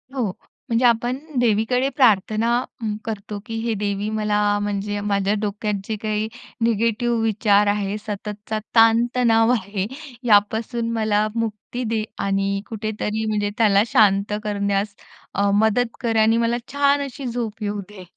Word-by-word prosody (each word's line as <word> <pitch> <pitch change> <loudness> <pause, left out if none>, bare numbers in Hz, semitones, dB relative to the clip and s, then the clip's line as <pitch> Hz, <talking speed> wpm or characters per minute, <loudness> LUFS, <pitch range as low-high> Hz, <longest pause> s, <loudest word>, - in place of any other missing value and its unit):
हो. 235 -7 0 0.4
म्हणजे 235 +2 +2
आपण 240 +2 +2 0.2
देवीकडे 245 +3 +2
प्रार्थना 220 -3 +3 0.3
हं, 215 -2 -2
करतो 210 -1 -5
की 225 - -6
हे 230 0 -1
देवी 205 0 -2
मला 215 -1 0 0.2
म्हणजे 205 0 -2
माझ्या 200 -1 +1
डोक्यात 210 0 -2
जे 220 - -2
काही 215 0 -1 0.4
निगेटिव्ह 230 +1 +1
विचार 210 -2 +3
आहे 205 0 0
सततचा 210 +1 -4 0.2
ताणतणाव 230 0 +4
आहे 200 -4 -1 0.4
यापासून 220 +2 +2
मला 215 -1 +1
मुक्ती 230 +2 -3
दे 225 -1 0 0.2
आणि 195 0 0
कुठेतरी 215 0 -3
म्हणजे 210 -1 0
त्याला 205 -3 +4
शांत 205 -1 +3
करण्यास 200 -1 -1 0.4
अ, 200 +1 +1
मदत 220 +3 +2
कर 230 -2 0
आणि 225 +1 +4
मला 235 +1 +1 0.2
छान 285 0 +3
अशी 275 0 -8
झोप 230 -3 -4
येऊ 205 0 -2
दे. 200 -3 -11
215 Hz, 140 wpm, -22 LUFS, 205-230 Hz, 0.4 s, ताणतणाव